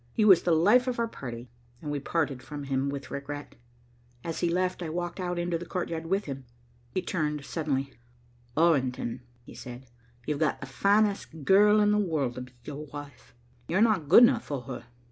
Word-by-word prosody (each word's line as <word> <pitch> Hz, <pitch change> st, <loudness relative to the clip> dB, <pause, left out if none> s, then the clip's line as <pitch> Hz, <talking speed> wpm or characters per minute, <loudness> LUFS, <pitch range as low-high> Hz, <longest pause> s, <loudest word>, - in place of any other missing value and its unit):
He 215 Hz, -, +2 dB
was 190 Hz, -5 st, +8 dB
the 170 Hz, -2 st, +2 dB
life 215 Hz, +10 st, +5 dB
of 250 Hz, -, -1 dB
our 235 Hz, 0 st, +1 dB
party, 120 Hz, -, -8 dB, 0.3 s
and 150 Hz, -, -5 dB
we 145 Hz, -, -1 dB
parted 145 Hz, -3 st, -1 dB
from 145 Hz, +2 st, -7 dB
him 135 Hz, 0 st, -1 dB
with 140 Hz, -1 st, -6 dB
regret. 145 Hz, +1 st, -6 dB, 0.7 s
As 165 Hz, -1 st, -4 dB
he 170 Hz, -, +1 dB
left, 180 Hz, +1 st, 0 dB
I 165 Hz, -, -3 dB
walked 175 Hz, +3 st, -4 dB
out 180 Hz, -1 st, -2 dB
into 175 Hz, -1 st, -1 dB
the 175 Hz, -, -7 dB
courtyard 165 Hz, -2 st, -3 dB
with 195 Hz, +3 st, 0 dB
him. 135 Hz, -2 st, -6 dB, 0.4 s
He 185 Hz, -, -2 dB
turned 150 Hz, -4 st, -2 dB
suddenly. 140 Hz, -4 st, -2 dB, 0.6 s
"Orrington," 130 Hz, -7 st, +1 dB, 0.2 s
he -, -, -13 dB
said, 125 Hz, +1 st, -9 dB, 0.4 s
"you've 150 Hz, -1 st, -2 dB
got 155 Hz, -2 st, +1 dB
the -, -, -6 dB
finest 200 Hz, +1 st, +1 dB
girl 210 Hz, +4 st, +6 dB
in 210 Hz, 0 st, +4 dB
the 210 Hz, -, +3 dB
world 155 Hz, -10 st, 0 dB
to 125 Hz, -, -6 dB
be 125 Hz, 0 st, -10 dB
your 150 Hz, +3 st, -7 dB
wife. 145 Hz, -4 st, -11 dB, 0.3 s
You're 180 Hz, +4 st, +1 dB
not 195 Hz, -10 st, +2 dB
good 230 Hz, -, +9 dB
enough 240 Hz, -1 st, +4 dB
for 140 Hz, -4 st, -4 dB
her. 120 Hz, -, -7 dB
155 Hz, 195 wpm, -28 LUFS, 140-185 Hz, 0.7 s, good